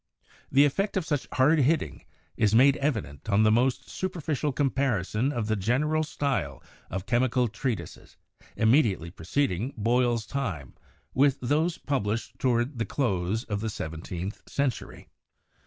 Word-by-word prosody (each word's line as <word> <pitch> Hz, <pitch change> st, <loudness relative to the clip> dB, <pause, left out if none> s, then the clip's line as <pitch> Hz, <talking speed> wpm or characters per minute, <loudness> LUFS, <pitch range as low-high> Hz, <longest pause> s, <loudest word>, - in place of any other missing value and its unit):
The 140 Hz, +2 st, +6 dB
effect 195 Hz, +8 st, 0 dB
of 185 Hz, -, -1 dB
such 145 Hz, -4 st, -2 dB
hard 150 Hz, +5 st, +4 dB
hitting 140 Hz, -, 0 dB, 0.3 s
is 110 Hz, -1 st, +2 dB
made 135 Hz, +4 st, +6 dB
evident 110 Hz, -, -3 dB
on 105 Hz, +1 st, +4 dB
the 110 Hz, -, +5 dB
most 125 Hz, +3 st, +1 dB
superficial 160 Hz, -6 st, -2 dB
com 135 Hz, 0 st, +1 dB
parison 120 Hz, -1 st, 0 dB
of 120 Hz, -5 st, -2 dB
the 110 Hz, 0 st, 0 dB
general 130 Hz, +10 st, +1 dB
style 130 Hz, -, -2 dB, 0.3 s
of 95 Hz, +1 st, -4 dB
chemical 120 Hz, +2 st, +2 dB
treatises 115 Hz, -, -5 dB, 0.4 s
imme 120 Hz, +8 st, +5 dB
diately 90 Hz, -, -3 dB
preceding 120 Hz, -, -1 dB
Boyle's 120 Hz, +1 st, +1 dB
time 95 Hz, -, -4 dB, 0.4 s
with 140 Hz, 0 st, +3 dB
those 155 Hz, +7 st, 0 dB
published 115 Hz, -6 st, -2 dB
toward 120 Hz, +1 st, 0 dB
the 115 Hz, -, 0 dB
close 105 Hz, -4 st, -1 dB
of 105 Hz, -4 st, -3 dB
the 110 Hz, -, -2 dB
seventeenth 85 Hz, +2 st, -5 dB
century." 140 Hz, -5 st, -3 dB
120 Hz, 140 wpm, -27 LUFS, 105-140 Hz, 0.4 s, The